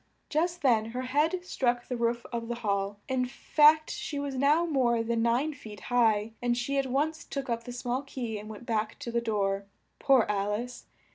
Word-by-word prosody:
Just 340 Hz, +2 st, 0 dB
then 230 Hz, -5 st, +4 dB
her 245 Hz, +3 st, -4 dB
head 310 Hz, +8 st, +1 dB
struck 245 Hz, -7 st, 0 dB
the 250 Hz, -, -2 dB
roof 235 Hz, 0 st, 0 dB
of 230 Hz, -1 st, -3 dB
the 240 Hz, -, -2 dB
hall; 200 Hz, 0 st, 0 dB
in 255 Hz, -1 st, 0 dB
fact 305 Hz, +4 st, +4 dB
she 290 Hz, -, -4 dB
was 280 Hz, -1 st, -3 dB
now 290 Hz, +6 st, +3 dB
more 245 Hz, -7 st, +2 dB
than 230 Hz, 0 st, 0 dB
nine 245 Hz, +7 st, +1 dB
feet 215 Hz, -7 st, -10 dB
high, 220 Hz, -3 st, +3 dB
and 240 Hz, 0 st, +1 dB
she 275 Hz, +3 st, 0 dB
at 270 Hz, -, 0 dB
once 300 Hz, +5 st, 0 dB
took 275 Hz, -3 st, -4 dB
up 230 Hz, 0 st, -2 dB
the 245 Hz, -, -6 dB
small 245 Hz, +1 st, -2 dB
key 240 Hz, -6 st, -5 dB
and 210 Hz, +1 st, -9 dB
went 220 Hz, +2 st, -9 dB
back 220 Hz, -2 st, -1 dB
to 275 Hz, -4 st, -6 dB
the 235 Hz, 0 st, +1 dB
door. 200 Hz, -3 st, 0 dB, 0.3 s
Poor 265 Hz, -5 st, +5 dB
Al 205 Hz, 0 st, 0 dB
ice! 245 Hz, +4 st, -5 dB
245 Hz, 205 wpm, -29 LUFS, 225-275 Hz, 0.3 s, Poor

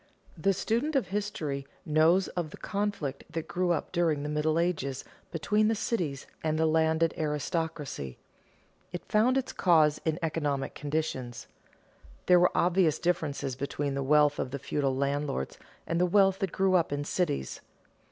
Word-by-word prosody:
_ -, -, -33 dB, 0.4 s
The 195 Hz, -, +4 dB
student 235 Hz, -, -1 dB
of 270 Hz, -, +1 dB
history 160 Hz, -9 st, -3 dB, 0.2 s
knows 160 Hz, +4 st, +4 dB
of 175 Hz, -3 st, -3 dB
the -, -, -11 dB
conflict 200 Hz, -9 st, -3 dB
that 165 Hz, 0 st, -4 dB
grew 180 Hz, 0 st, -1 dB
up 170 Hz, -, -1 dB
during 165 Hz, -5 st, +1 dB
the 150 Hz, -, -3 dB
Middle 150 Hz, +1 st, +1 dB
Ages 150 Hz, -6 st, -1 dB, 0.3 s
between 210 Hz, +7 st, +1 dB
the 225 Hz, -, +2 dB
cities 175 Hz, -, -2 dB, 0.2 s
and 155 Hz, -1 st, 0 dB
the 160 Hz, -, +2 dB
landed 160 Hz, +1 st, +2 dB
aristocracy. 150 Hz, -, -3 dB, 0.7 s
It 175 Hz, -, -6 dB
found 235 Hz, +5 st, +3 dB
its 265 Hz, -, -2 dB
cause 155 Hz, -4 st, +3 dB
in 160 Hz, -1 st, 0 dB
economic 145 Hz, -4 st, -1 dB
conditions. 145 Hz, -5 st, -3 dB, 0.8 s
There 180 Hz, -1 st, +6 dB
were 180 Hz, -, +3 dB
obvious 170 Hz, -3 st, +3 dB
differences 145 Hz, -6 st, -1 dB
between 140 Hz, +1 st, -3 dB
the 140 Hz, -, -2 dB
wealth 145 Hz, +1 st, +3 dB
of -, -, -1 dB
the 140 Hz, -, -4 dB
feudal 140 Hz, 0 st, -1 dB
landlords, 140 Hz, -, -2 dB, 0.3 s
and 170 Hz, +1 st, 0 dB
the 180 Hz, -, +4 dB
wealth 195 Hz, 0 st, +4 dB
that 195 Hz, -3 st, -1 dB
grew 190 Hz, -1 st, +2 dB
up 175 Hz, -5 st, +3 dB
in 145 Hz, 0 st, -1 dB
cities. 145 Hz, -, -2 dB
160 Hz, 160 wpm, -29 LUFS, 145-180 Hz, 0.8 s, There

